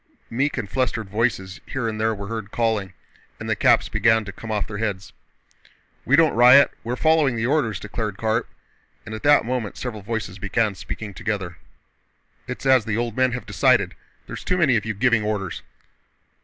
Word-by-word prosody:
meek 135 +5 0
and 120 -5 -3
flustered 120 -2 -1
voices 105 -4 -1
here 130 -4 -3
and 110 -1 -3
there 110 0 +1
were 100 0 -7
heard 110 -1 -5
calling 110 -4 -1 0.5
and - - -2
caps - - +4
began 110 -2 +2
to 100 - -6
come 110 +3 -10
off 105 -2 -1
their 105 -2 -7
heads. 100 -3 -3 0.9
"We 135 - +4
don't 160 0 +4
riot, 125 +4 +7
we're 120 +2 -2
following 155 -3 +3
the 115 0 -1
orders," 125 - 0
declared 105 -1 -4
Karp, 110 +1 -1 0.6
and 110 - -7
at 110 - -6
that 145 -3 +5
moment 120 -4 -3
several 115 -4 -5
voices 100 -3 -4
began 100 +2 0
speaking 105 +2 -7
together. 95 -3 -4 0.9
"It's 125 +2 -6
as 130 -4 +4
the 110 -1 -1
old 120 -2 -2
men 130 -1 +2
have 125 -2 -5
decided—there's - - -1
too 180 - 0
many 150 -8 +3
of 105 -2 0
you 110 -1 -3
giving 115 +1 +2
orders." 105 -4 -3
110 Hz, 180 wpm, -23 LUFS, 105-125 Hz, 0.9 s, riot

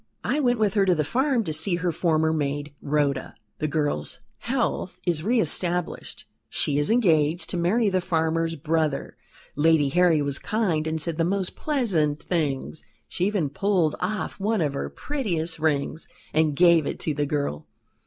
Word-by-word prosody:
"I 295 - 0
went 245 -4 +2
with 210 -3 +1
her 200 - +3
to 180 - +4
the 155 - +1
farm 255 - +1
to 160 -5 -3
see 160 +4 +1
her 175 0 -1
former 160 -1 +1
maid, 145 -1 -2
Rhoda. 140 -2 -1 0.2
The 155 - 0
girl's 145 - -1 0.2
health 235 -7 -2
is 170 -4 0
re 230 +7 +2
established; 180 -5 -2 0.2
she 145 -1 0
is 145 - 0
engaged 170 -8 +2
to 180 - -2
marry 200 +7 +2
the 185 -2 +1
farmer's 165 -1 0
brother. 155 -1 -1 0.4
Lady 150 -1 +3
Harry 170 -1 +3
was 140 -1 -2
kind, 180 -8 0
and 160 0 -1
said 165 +1 -2
the - - +3
most 190 +1 -1
pleasant 170 - 0
things; 155 -3 -2 0.3
she 180 - -1
even 185 -9 -1
pulled 180 -2 +1
off 200 +3 -3
one 210 0 0
of 145 -3 0
her 140 - -3
prettiest 170 - -3
rings 155 0 -1 0.3
and 155 -2 +2
gave 170 -2 +5
it - - -4
to 155 - -1
the 145 0 -1
girl. 140 - -2
165 Hz, 175 wpm, -25 LUFS, 150-190 Hz, 0.4 s, gave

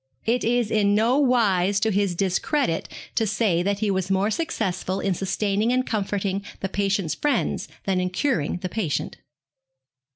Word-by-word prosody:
It 235 +2 +1
is 235 -1 +1
in 205 -1 +3
no 235 +6 +3
wise 205 -8 +3
to 220 -1 +2
his 200 -2 +1
discredit 190 - 0 0.2
to 225 - +1
say 200 -5 +1
that 200 +2 -1
he 210 -2 +1
was 190 -1 -1
more 195 +2 +2
successful 195 - -2
in 195 - 0
sustaining 200 +4 0
and 255 0 +1
comforting 200 -2 -1 0.2
the 195 - -3
patient's 195 -4 0
friends 295 -1 0 0.2
than 190 -2 0
in 180 0 0
curing 180 - 0
the 185 - -2
patient. 180 -8 -2
200 Hz, 160 wpm, -24 LUFS, 190-225 Hz, 0.2 s, in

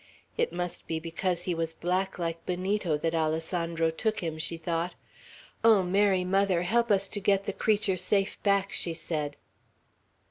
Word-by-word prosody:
"It 475 - 0
must 175 -1 -4
be 160 -1 -1
because 170 +2 -2
he 180 - -1
was 165 -1 -2
black 185 +3 -1
like 165 -1 -3
Benito, 185 -2 0
that 165 +2 -1
Alessandro 165 +1 0
took 215 +6 -1
him," 160 -2 -3
she 165 +1 -1
thought. 165 +1 -2 0.7
"Oh, 220 -4 +6
Mary 190 0 +2
Mother, 190 -2 +2
help 235 +5 +2
us 195 -1 +3
to 205 - -3
get 200 -1 +2
the 200 - -3
creature 205 -3 +1
safe 195 +2 +1
back!" 200 -1 +2
she 170 -2 -2
said. 150 -3 -3
180 Hz, 165 wpm, -28 LUFS, 165-195 Hz, 0.7 s, Oh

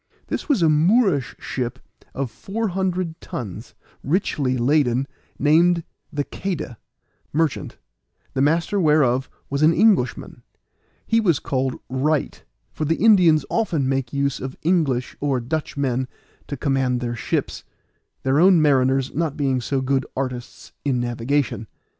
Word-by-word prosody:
This - - -4
was 250 - +3
a - - +5
Moorish 160 - +3
ship 125 0 -4 0.4
of 135 -3 -3
four 210 - -3
hundred 180 -2 -2
tons, 110 -1 -7 0.3
richly 140 -5 0
laden, 130 0 +2 0.3
named 165 +4 +4 0.3
the 145 -1 -1
Queda, 165 - -5 0.5
merchant, 155 -2 -1 0.6
the 135 - 0
master 165 +7 +2
whereof 145 -6 +3 0.2
was 140 +1 -1
an 155 +2 +6
Englishman 190 - +2 0.6
he 225 - +2
was 175 -9 +3
called 130 -2 -1
Wright, 140 +4 -1 0.3
for - - -4
the 160 +2 +1
Indians 180 -9 +5
often 170 -12 0
make 135 -2 -1
use 140 -1 -1
of 130 0 -6
English 150 -8 +1
or 140 -3 0
Dutch 150 +6 -4
men 130 -2 0 0.4
to 140 - -5
command 130 -2 0
their 120 -1 -3
ships, 110 - -2 0.6
their 135 +2 +2
own 180 0 +6
mariners 135 -2 +2
not 155 -1 -1
being 135 -3 0
so 135 +3 -1
good 135 0 0
artists 125 -2 -5
in 135 -3 0
navigation. 120 -1 -1
140 Hz, 135 wpm, -22 LUFS, 130-165 Hz, 0.6 s, an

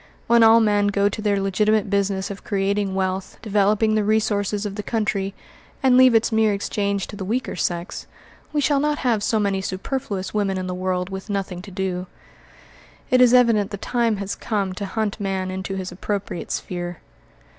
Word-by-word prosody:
When 235 0 +4
all 225 0 +7
men 205 -2 +3
go 200 0 +2
to 215 - -5
their 205 -2 +1
legitimate 210 +2 +1
business 200 -1 0
of 200 - -8
creating 200 -1 0
wealth, 190 0 -2
developing 210 +1 +2
the 215 -1 +2
resources 210 -1 0
of 205 - -3
the 210 - -4
country, 200 -2 -1 0.5
and 260 -2 +5
leave 255 -2 +7
its 225 +1 +3
mere 220 -2 +3
exchange 200 -1 -1
to - - -9
the 200 - -5
weaker 235 +7 -2
sex, 175 +1 -3 0.4
we 300 -1 0
shall 285 0 +2
not 295 +1 +1
have 235 -5 +1
so 220 +1 +1
many 200 -2 0
superfluous 190 0 -4
women 200 -2 0
in 185 - -3
the 180 - -3
world 185 0 -2
with 190 +2 -7
nothing 195 -3 -3
to 195 - -11
do. 185 -1 -3 1.0
It 255 0 +5
is 250 -1 +7
evident 230 -5 +4
the 200 - -5
time 230 +1 0
has 200 0 -3
come 200 -4 -2
to 200 +1 -5
hunt 215 +1 -2
man 190 -2 -2
into 190 +1 -4
his 185 -1 -4
appropriate 195 0 -4
sphere. 175 -2 -4
200 Hz, 190 wpm, -22 LUFS, 190-220 Hz, 1.0 s, all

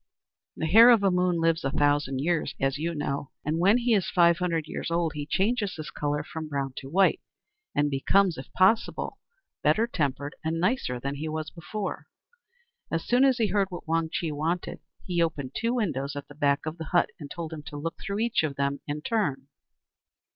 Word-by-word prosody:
The - - -3
Hare 225 +9 +8
of 235 -2 +7
the 195 -1 +3
Moon 180 -1 +2
lives 165 0 +2
a 135 - 0
thousand 145 -2 +1
years, 170 +1 0
as 135 +1 0
you 165 +2 -2
know, 140 -1 -3 0.2
and 155 +2 0
when 200 +6 +5
he 240 -1 +2
is 195 -4 +2
five 170 -1 +4
hundred 170 -4 0
years - - -4
old 170 -1 +1
he 145 -1 -5
changes 205 +1 0
his 155 -1 -7
colour, 145 0 -2
from 155 +1 -6
brown 140 -2 -2
to 135 - -7
white, 190 +5 +3 0.5
and 145 0 +2
becomes, 180 +6 +3
if 130 - -10
possible, 190 +5 +2 0.4
better 220 +1 +3
tempered 145 - -2
and 160 +1 -1
nicer 180 - 0
than 140 +3 -3
he 155 +2 -4
was 155 0 -4
before. 195 +4 -5 0.8
As 165 0 -2
soon 245 +2 +3
as 265 -3 +4
he 220 -3 +1
heard 200 -2 +2
what 175 -3 -8
Wang 165 0 +1
Chih 165 -2 -2
wanted, 160 +4 -2 0.3
he 175 -2 0
opened 145 -6 -1
two 235 +1 0
windows 145 - -1
at 145 0 -6
the - - -12
back 145 -1 +1
of 160 +2 -5
the 160 - -4
hut, 175 +2 +2
and 145 -3 -8
told 165 0 -6
him 155 - -6
to 145 0 -7
look 165 +3 -5
through 200 +2 -3
each 235 0 +2
of 150 -3 -2
them 140 0 -1
in 150 +1 -4
turn. 145 - -1
160 Hz, 205 wpm, -27 LUFS, 145-190 Hz, 0.8 s, Hare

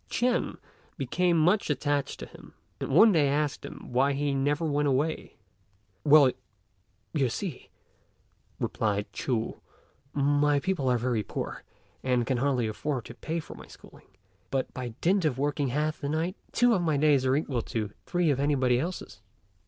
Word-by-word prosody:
Ch'ên 245 0 0 0.4
became 170 +6 +1
much 180 +6 +3
attached 145 0 -1
to - - -4
him, - - -15 0.2
and - - -4
one 215 +11 +7
day 155 -6 +3
asked 145 +1 0
him - - -9
why 135 +3 +3
he 140 0 0
never 145 +4 0
went 145 -1 +1
away. 145 +4 -1 0.7
"Well, 145 -3 +7 0.8
you 140 -5 +2
see," 160 - -5 0.9
replied 105 -2 -1
Ch'u, 115 -4 -2 0.5
"my 145 +1 +3
people 170 -5 -1
are 125 - +3
very 120 -2 0
poor, - - -5 0.4
and 125 -2 +1
can 130 0 0
hardly 130 -2 +1
afford 125 +3 -3
to - - -9
pay 160 +7 -4
for 155 - -9
my - - -12
schooling; - - -16 0.4
but, 135 -1 -2
by 125 -3 -6
dint 190 +2 +3
of 145 -6 +1
working 145 +1 0
half 150 +5 -1
the 140 - -2
night, 165 +5 -1 0.2
two 245 0 +4
of 190 - +2
my 155 -4 +1
days 145 -2 +4
are 130 0 +2
equal 140 -5 -1
to 110 -2 -3 0.2
three 175 -3 +2
of 135 - 0
anybody 130 -4 +2
else's." 160 - -5
145 Hz, 165 wpm, -28 LUFS, 130-155 Hz, 0.9 s, one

